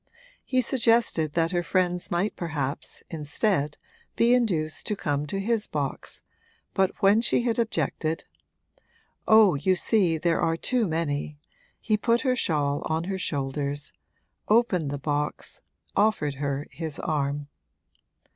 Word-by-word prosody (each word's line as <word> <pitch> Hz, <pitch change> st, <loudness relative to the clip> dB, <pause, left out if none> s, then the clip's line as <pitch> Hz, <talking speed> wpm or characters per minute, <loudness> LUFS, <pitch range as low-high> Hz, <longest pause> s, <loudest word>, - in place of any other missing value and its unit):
He 255 Hz, -1 st, +1 dB
suggested 230 Hz, -, +2 dB
that 165 Hz, +1 st, +1 dB
her 175 Hz, -1 st, +1 dB
friends 180 Hz, 0 st, 0 dB
might 175 Hz, +5 st, 0 dB
perhaps, 150 Hz, -4 st, -2 dB
instead, 150 Hz, 0 st, -1 dB, 0.4 s
be 235 Hz, +1 st, +4 dB
induced 175 Hz, -11 st, 0 dB
to 210 Hz, -, 0 dB
come 145 Hz, -5 st, -2 dB
to 195 Hz, -, -3 dB
his 220 Hz, +1 st, 0 dB
box, 140 Hz, -3 st, -4 dB, 0.5 s
but 190 Hz, +2 st, 0 dB
when 205 Hz, +3 st, +6 dB
she 235 Hz, -, +2 dB
had 235 Hz, -1 st, 0 dB
objected, 160 Hz, -, -1 dB, 1.0 s
'Oh, 220 Hz, -3 st, +7 dB
you 185 Hz, +7 st, +2 dB
see, 180 Hz, -4 st, +2 dB
there 165 Hz, +1 st, +1 dB
are 165 Hz, 0 st, +1 dB
too 245 Hz, +3 st, 0 dB
many,' 150 Hz, -3 st, -2 dB, 0.4 s
he 215 Hz, -2 st, +1 dB
put 235 Hz, +2 st, +2 dB
her 255 Hz, -2 st, +1 dB
shawl 145 Hz, -, 0 dB
on 160 Hz, +1 st, -1 dB
her 190 Hz, +1 st, -3 dB
shoulders, 145 Hz, -1 st, -3 dB, 0.5 s
opened 210 Hz, -9 st, +3 dB
the 145 Hz, -, -3 dB
box, 145 Hz, +1 st, -2 dB, 0.3 s
offered 200 Hz, -9 st, +2 dB
her 140 Hz, 0 st, -2 dB
his 160 Hz, -3 st, -4 dB
arm. 145 Hz, -2 st, -2 dB
170 Hz, 135 wpm, -26 LUFS, 145-215 Hz, 1.0 s, Oh